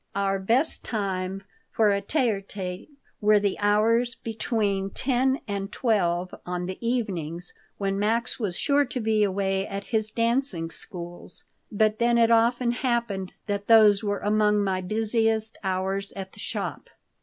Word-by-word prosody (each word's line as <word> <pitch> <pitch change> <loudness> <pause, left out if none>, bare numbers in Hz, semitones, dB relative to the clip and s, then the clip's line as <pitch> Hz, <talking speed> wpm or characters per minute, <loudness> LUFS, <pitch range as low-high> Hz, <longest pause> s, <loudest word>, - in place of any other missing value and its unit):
Our 195 -1 0
best 235 +11 +1
time 195 -3 -3 0.3
for 215 -2 +3
a 200 - 0
tê 260 +6 +1
à 200 -2 -3
tˆte 185 -2 -6 0.3
were 210 0 +5
the 200 -1 0
hours 225 +4 +2
between 210 -3 -1
10 260 +4 +1
and 200 -1 -3
12 180 -6 0
on 180 0 -3
the 185 +1 -6
evenings, 180 -8 -2 0.2
when 195 -1 -1
Max 230 +5 0
was 200 -6 -1
sure 285 0 +3
to 255 -1 -4
be 220 -2 +2
away 195 0 0
at 200 0 -5
his 215 -1 0
dancing 230 -7 0
schools, 175 0 -8 0.3
but 215 +1 +2
then 235 0 +3
it 230 0 +4
often 235 +1 +3
happened 235 -6 -1
that 205 0 -3
those 215 -2 +6
were 205 -1 -1
among 210 0 +2
my 190 -1 0
busiest 220 +2 0
hours 190 +1 -1
at 190 -1 -7
the - - -16
shop. - - -5
205 Hz, 155 wpm, -26 LUFS, 195-230 Hz, 0.3 s, those